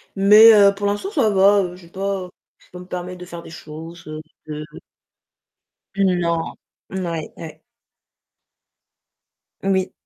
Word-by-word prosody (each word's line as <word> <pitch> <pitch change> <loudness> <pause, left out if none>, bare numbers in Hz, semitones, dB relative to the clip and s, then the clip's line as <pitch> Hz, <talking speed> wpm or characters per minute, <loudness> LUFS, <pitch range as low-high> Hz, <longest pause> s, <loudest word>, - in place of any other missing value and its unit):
Mais, 210 +3 +8
heu, 200 -1 +6
pour 205 +1 -4
l'instant 205 - -2
ça 270 - +2
va, 200 0 +4
heu, 180 -1 -6
j'ai 180 -2 -16
pas, 195 +1 -3
heu - - -12 0.3
je - - -25
peux 180 - -10
me 180 - -10
permettre 180 0 -6
de 180 - -8
faire 170 -1 -9
des - - -12
choses, 165 +1 -10
heu 155 0 -7 0.3
heu 150 0 -6 1.3
Non. 175 -4 0 0.4
Mouais, 170 -5 -4
ouais. 160 -2 -10 2.0
Oui. 190 -1 0
180 Hz, 145 wpm, -21 LUFS, 170-200 Hz, 2.0 s, Mais